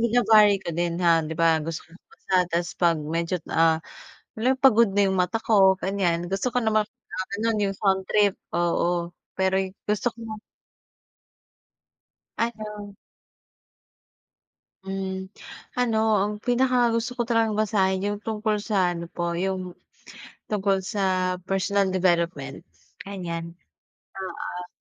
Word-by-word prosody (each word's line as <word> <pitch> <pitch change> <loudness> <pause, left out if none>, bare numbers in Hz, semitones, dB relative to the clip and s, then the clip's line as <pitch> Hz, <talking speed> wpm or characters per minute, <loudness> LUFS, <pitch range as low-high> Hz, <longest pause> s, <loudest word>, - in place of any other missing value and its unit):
vina-vary 220 -3 +5
ko 170 - -3
din 170 +1 -1
ha 165 -1 +5
'di 160 0 -5
ba 165 -1 +3
gusto 165 +1 -5
ko - - -26
magbasa 185 +1 -8
tas 170 0 -1
'pag 170 -2 +2
medyo, 165 +3 -1 0.2
ah, 160 0 +3 0.5
halim 260 +4 +1
pagod 235 -6 +5
na 200 0 +3
yung 190 - 0
mata 185 +5 +1
ko 195 -4 +4
ganyan 175 -3 0
gusto 195 +7 -1
ko 250 - +1
naman 215 -2 +2 0.6
ganun, 225 0 +1
yung 195 0 -1
sound 190 -1 +1
trip, 205 -1 +3 0.2
oo. 175 0 0 0.2
Pero, 190 0 +1
yu 190 0 -4
gusto 210 +3 0
ko 225 -2 -7 2.0
Ano. 210 -3 -4 1.9
Mm. 190 0 -4 0.5
Ano, 240 -3 +1 0.2
ang 210 - -1
pinakagusto 245 0 +1
ko 240 - +2
talagang 225 -2 +1
basahin 195 -3 +2
yung 205 0 -2
tungkol 215 -1 -1
sa 185 -5 +1
ano 170 0 -7
po 170 0 -2
yung 185 0 -3 0.8
tungkol 195 -2 +1
sa 185 -2 0
personal 195 0 +1
development, 170 -5 0 0.4
ganyan. 170 -4 -5 0.7
Oo. 180 -1 -6
190 Hz, 125 wpm, -25 LUFS, 175-215 Hz, 2.0 s, vina-vary